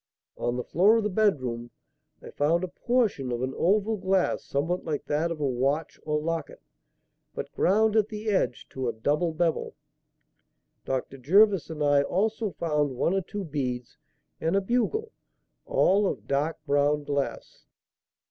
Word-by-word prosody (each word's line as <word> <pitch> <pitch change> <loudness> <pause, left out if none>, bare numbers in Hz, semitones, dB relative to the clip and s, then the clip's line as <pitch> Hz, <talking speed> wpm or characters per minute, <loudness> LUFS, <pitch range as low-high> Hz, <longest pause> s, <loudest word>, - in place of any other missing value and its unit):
On 120 - -2
the 125 - -2
floor 200 - +4
of 225 - 0
the 210 - -1
bedroom, 130 - 0 0.5
I - - -9
found 165 +5 +1
a - - -1
portion 200 - 0
of 120 +1 -2
an 130 +1 -2
oval 210 +4 +2
glass 190 -1 +1
somewhat 165 +6 -1
like 150 -3 -3
that 155 +3 0
of 165 -2 -4
a 145 - 0
watch 135 +4 -1
or 150 -1 -1
locket, 165 0 -3 0.8
but - - -5
ground 215 +3 +2
at 215 -1 +3
the 215 0 -6
edge 200 - 0
to 130 -2 -3
a - - -3
double 150 +9 0
bevel. 160 0 -1 1.1
Dr. 135 +1 -3
Jervis 195 - +4
and 155 -2 -3
I 145 -1 +4
also 215 +8 0
found 150 -5 -1
one 170 - +1
or 195 - +1
two 200 +3 -6
beads 130 -4 -4 0.4
and 165 +4 0
a 195 - +3
bugle, 250 - 0 0.6
all 205 - +3
of - - -4
dark 145 +4 0
brown 145 +1 +2
glass." 140 -1 -4
165 Hz, 160 wpm, -27 LUFS, 140-200 Hz, 1.1 s, floor